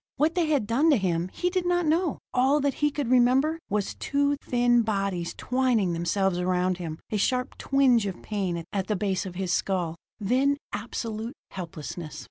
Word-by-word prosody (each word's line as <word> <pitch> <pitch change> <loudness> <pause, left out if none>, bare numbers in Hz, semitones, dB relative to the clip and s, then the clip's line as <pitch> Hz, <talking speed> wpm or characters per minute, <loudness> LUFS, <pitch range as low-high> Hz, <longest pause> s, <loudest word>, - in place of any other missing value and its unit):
What 305 +4 +2
they 345 -2 +1
had 290 -8 +2
done 255 +9 +3
to 290 - +5
him, 180 -3 0
he 360 0 -1
did 370 -1 0
not 350 -1 +2
know; 325 +1 +1 0.2
all 265 +3 +3
that 280 -1 +1
he 295 - +4
could 285 -4 -3
remember 260 +6 +4
was 205 -1 -1
two 285 0 0
thin 240 -3 +2
bodies 195 -5 -2
twining 250 -8 +1
themselves 175 +2 0
around 180 0 +1
him 160 -3 -5
a 215 - +1
sharp 250 +5 0
twinge 255 -6 +3
of 190 - -6
pain 185 -6 -2
at 195 -2 -1
the 210 - 0
base 195 -1 -1
of 180 - -8
his 185 -1 -1
skull; 180 -5 0 0.2
then 260 +7 +2 0.2
absolute 225 +2 -4 0.2
helplessness. 160 -3 -7
220 Hz, 180 wpm, -26 LUFS, 185-275 Hz, 0.2 s, to